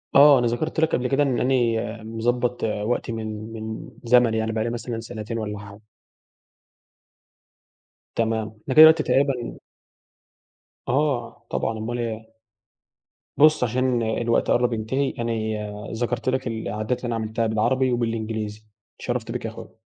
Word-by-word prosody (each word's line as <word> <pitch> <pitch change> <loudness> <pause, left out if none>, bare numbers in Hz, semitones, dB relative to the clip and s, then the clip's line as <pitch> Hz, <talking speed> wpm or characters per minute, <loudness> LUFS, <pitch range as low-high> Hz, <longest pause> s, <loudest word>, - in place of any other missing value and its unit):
آه 140 -1 +8
أنا 120 - +1
ذكرت 155 +7 -2
لك 160 - +3
قبل 125 +1 0
كده 140 +2 +2
إن 130 -3 0
أنا 115 -3 0
مضبّط 120 +2 -1
وقتي 110 +2 -1
من 110 0 -5
من 110 0 -6
زمن 120 -1 +4
يعني 110 0 0
بقى 110 -1 -1
لي 115 - -1
مثلًا 115 0 -4
سنتين 115 0 -6
والّا 105 -2 -4
حاجة. 100 0 -12 2.3
تمام 110 -1 0
إحنا 130 - -3
كده - - -7
دلوقت 160 0 +8
تقريبًا 135 -4 0 1.3
آه 125 -4 -1
طبعًا 110 - -1
أمال 120 +3 -3
إيه. 110 -1 -5 1.0
بُص 155 -2 +5
عشان 125 0 +1
الوقت 115 +1 +1
قرب 120 0 +2
ينتهي 130 +5 -1
انا 115 0 -1 0.6
ذكرت 120 +2 -2
لك 130 -1 -1
العادات 110 +1 -2
اللي 125 - -5
أنا 120 - -1
عملتها 110 +1 -1
بالعربي 125 +4 +1
وبالإنجليزي 110 -2 -2 0.4
اتشرفت - - -3
بيك - - -4
يا - - -2
أخويا. - - -11
115 Hz, 140 wpm, -24 LUFS, 110-125 Hz, 2.3 s, آه